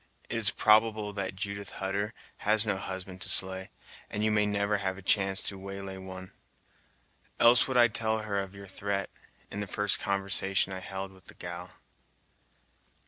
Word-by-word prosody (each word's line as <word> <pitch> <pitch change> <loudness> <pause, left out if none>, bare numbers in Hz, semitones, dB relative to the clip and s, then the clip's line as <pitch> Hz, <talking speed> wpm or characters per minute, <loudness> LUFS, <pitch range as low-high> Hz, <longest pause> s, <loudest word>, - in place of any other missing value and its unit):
It 115 - -2
is 110 -3 +5
probable 110 -1 +3
that 100 -2 -4
Judith 100 -1 -5
Hutter 100 +3 -2 0.2
has 105 +1 +3
no 105 -2 +1
husband 95 -1 -6
to - - -1
slay, 95 0 +3 0.4
and 105 - -2
you 110 - +2
may 105 -1 +3
never 100 0 +1
have 95 -1 -2
a 100 - -11
chance 95 0 +2
to 100 - -4
waylay 95 0 -6
one, 95 -1 -9 1.1
else 120 +1 +6
would 130 -2 0
I 120 -1 +7
tell 110 -1 -1
her 100 -2 -1
of 95 0 -5
your 100 0 -10
threat, 100 +1 -3 0.4
in 100 - -5
the 105 - -3
first 105 +1 +4
conversation 95 -1 +1
I 95 - -4
held 95 +1 -6
with 95 -1 -19
the - - -13
gal." 90 0 -8
100 Hz, 175 wpm, -29 LUFS, 95-105 Hz, 1.1 s, I